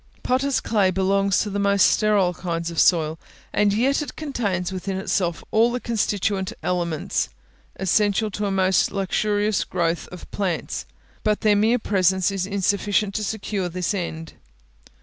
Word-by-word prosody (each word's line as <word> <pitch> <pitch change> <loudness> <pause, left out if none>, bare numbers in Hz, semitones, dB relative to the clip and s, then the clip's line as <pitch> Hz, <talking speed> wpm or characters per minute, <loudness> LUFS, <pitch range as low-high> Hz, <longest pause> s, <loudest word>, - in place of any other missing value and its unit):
Potters' 265 +2 +1
clay 205 -4 +2
belongs 195 +1 +2
to 210 - -3
the 200 - -2
most 200 0 +4
sterile 205 -4 +3
kinds 170 -1 -3
of 165 - -3
soil, 160 -2 +3 0.3
and 210 -1 +3
yet 260 +8 +2
it 295 - -6
contains 205 - -2
within 190 0 -4
itself 180 -4 -1
all 230 +2 +4
the 245 - -2
constituent 205 -4 -1
elements 170 - -1 0.5
essential 205 +3 +1
to 205 +1 -2
a - - -1
most 190 -1 +2
luxurious 205 +2 0
growth 170 -2 -1
of 180 - -10
plants; 190 -5 -3 0.4
but 210 -1 +1
their 210 -1 +4
mere 220 +4 +3
presence 190 -3 +1
is 190 -1 -2
insufficient 200 +1 0
to 215 - -2
secure 200 -3 -3
this 180 +2 -2
end. 165 -4 -5
195 Hz, 150 wpm, -23 LUFS, 180-210 Hz, 0.5 s, most